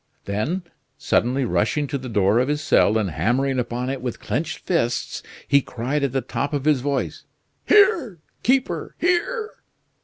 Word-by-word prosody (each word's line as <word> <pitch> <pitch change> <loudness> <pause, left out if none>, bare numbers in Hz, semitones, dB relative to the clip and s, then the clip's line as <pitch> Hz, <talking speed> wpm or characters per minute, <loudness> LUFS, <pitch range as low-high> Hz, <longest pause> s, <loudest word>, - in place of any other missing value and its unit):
Then, 130 - -2 0.3
suddenly 130 +3 +1
rushing 120 +6 +1
to 140 - -3
the 130 0 -7
door 105 0 +3
of 125 - +1
his 150 +1 -1
cell, 110 - +4
and 100 -5 -1
hammering 125 - +1
upon 120 +1 -2
it 135 - -4
with 125 -2 -4
clenched 165 +3 -2
fists, 120 -9 -1 0.3
he 140 - +5
cried 125 +4 -3
at 140 - +1
the 135 +1 0
top 140 +3 -3
of 140 -1 -2
his 150 -4 +3
voice: 140 0 -2 0.4
"Here! 345 - +4 0.2
keeper! 260 +2 0
here!" 430 +6 0
135 Hz, 160 wpm, -23 LUFS, 120-165 Hz, 0.4 s, he